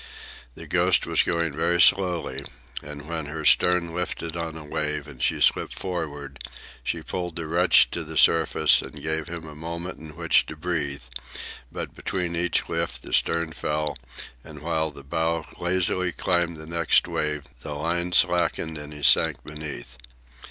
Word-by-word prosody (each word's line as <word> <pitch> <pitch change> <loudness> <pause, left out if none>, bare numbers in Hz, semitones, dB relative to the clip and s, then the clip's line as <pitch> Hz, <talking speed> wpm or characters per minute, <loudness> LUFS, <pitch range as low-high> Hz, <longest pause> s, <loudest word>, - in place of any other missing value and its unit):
The - - -9
Ghost - - +3
was - - +3
going 85 -3 0
very 85 +4 +1
slowly, 85 -8 +4 0.4
and 75 0 -9
when 80 -3 -3
her 80 +1 -5
stern 90 0 +4
lifted 85 -1 -3
on 80 -1 -4
a 80 - -9
wave 75 0 -2
and 65 -4 -11
she - - +1
slipped - - +3
forward 75 -7 -5 0.4
she - - -2
pulled 90 -2 -4
the 85 -2 -4
wretch 85 +2 +5
to - - -3
the - - -6
surface 80 -1 +5
and - - -10
gave 80 0 -2
him 85 -1 -7
a 75 - -9
moment 85 +4 -6
in 80 -1 -11
which 85 -1 +3
to 80 - -7
breathe; 75 -5 -2 0.7
but - - -6
between 90 -2 -2
each 90 +1 +1
lift - - -3
the - - -8
stern 85 -1 +2
fell, 75 -1 -2 0.5
and 75 -2 -11
while 80 -1 0
the 70 -2 -11
bow 80 +3 -1
lazily 90 0 +1
climbed 85 -1 0
the 80 - -9
next 85 0 +2
wave 75 -1 -1 0.2
the 75 - -6
line 85 +4 -1
slacked 90 -1 +3
and 75 -2 -6
he 75 -1 -9
sank 65 - +5
beneath. 75 -5 -7
80 Hz, 165 wpm, -25 LUFS, 75-85 Hz, 0.7 s, wretch